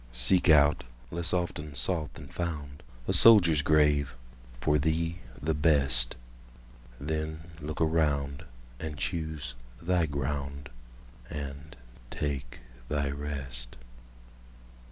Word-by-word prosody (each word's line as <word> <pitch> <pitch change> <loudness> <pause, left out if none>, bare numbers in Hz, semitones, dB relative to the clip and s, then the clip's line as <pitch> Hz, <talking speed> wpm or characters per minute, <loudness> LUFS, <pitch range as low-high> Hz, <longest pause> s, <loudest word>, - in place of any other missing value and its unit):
Seek - - +6
out—less 75 +1 +2
often 80 -5 -2
sought 80 -3 0
than 75 -3 -10
found—A 70 -7 -5
soldier's 90 -10 +7
grave, 75 -3 +3 0.4
for 75 +4 +2
thee 80 +3 -1 0.2
the 80 +3 0
best; 70 -5 +3 0.8
Then 80 +2 -3 0.2
look 75 +1 -5
around, 75 -3 +1 0.4
and 80 -2 -5
choose 80 -7 -4 0.3
thy 85 -1 +1
ground, 70 -1 -4 0.6
And 70 +1 -7 0.3
take 70 -4 -4 0.3
thy 70 -1 0
rest. 70 -4 -5
75 Hz, 95 wpm, -29 LUFS, 70-80 Hz, 0.8 s, soldier's